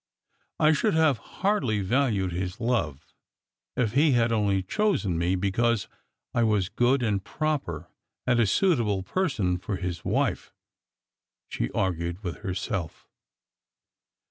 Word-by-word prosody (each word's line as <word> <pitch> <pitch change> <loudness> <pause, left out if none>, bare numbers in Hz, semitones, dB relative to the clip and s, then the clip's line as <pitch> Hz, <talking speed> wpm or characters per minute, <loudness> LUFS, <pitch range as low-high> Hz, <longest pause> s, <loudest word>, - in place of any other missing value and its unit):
I 155 - +5
should 155 +1 +2
have 155 -7 +3
hardly 135 - 0
valued 105 -3 +1
his 90 +3 -4
love 85 - -1 0.7
if 115 -5 +1
he 145 +2 +4
had 115 -1 +3
only 100 -4 +1
chosen 110 - 0
me 85 +3 +1
because 100 +3 +1 0.5
I 120 - +2
was 105 -5 +2
good 125 +2 +2
and 100 -4 0
proper, 135 - -2 0.4
and 120 -1 +3
a 115 - +4
suitable 110 - +2
person 110 - 0
for 95 +2 -3
his 90 -2 -4
wife," - - -1 1.0
she - - -2
argued 85 +1 -1
with 90 -3 -4
herself. 95 -2 -4
105 Hz, 125 wpm, -27 LUFS, 90-125 Hz, 1.0 s, I